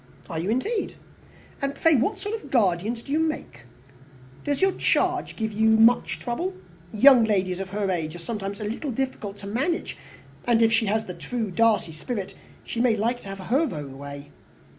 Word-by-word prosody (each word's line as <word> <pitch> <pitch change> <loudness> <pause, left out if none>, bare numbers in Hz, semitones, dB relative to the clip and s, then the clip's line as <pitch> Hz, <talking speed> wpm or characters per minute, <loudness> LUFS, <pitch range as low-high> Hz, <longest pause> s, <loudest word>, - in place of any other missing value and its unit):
"Are 160 - -2
you, 175 +5 -2
indeed? 405 - -1 0.7
And 275 0 -1
pray 325 +3 +4
what 285 - +1
sort 410 +2 -5
of 450 - -5
a - - -10
guardian 210 -4 +2
do 235 +4 -10
you 305 - +2
make? 305 - -3 0.8
Does 285 -1 -1
your 385 0 +4
charge - - +1
give 220 -1 -3
you 220 +2 +3
much 225 +2 +4
trouble? 350 +11 -3 0.4
Young 250 +2 +7
ladies 190 -4 +1
of 195 -1 -4
her 200 0 -1
age 160 -2 -2
are - - -6
sometimes 200 +2 -5
a - - -4
little 230 +8 -3
difficult 235 -5 -3
to 200 - -10
manage; 270 - -2 0.5
and 230 -1 +4
if 225 0 +4
she 225 -1 +2
has 220 +2 +1
the 180 - -6
true 205 +6 -4
Darcy 220 -3 +2
spirit, 190 +6 -5 0.3
she 235 - -3
may 240 -3 +4
like 235 +4 0
to 195 - -9
have 195 - -6
her 260 - +1
own 140 -4 -7
way." 140 0 -9
220 Hz, 195 wpm, -25 LUFS, 195-260 Hz, 0.8 s, Young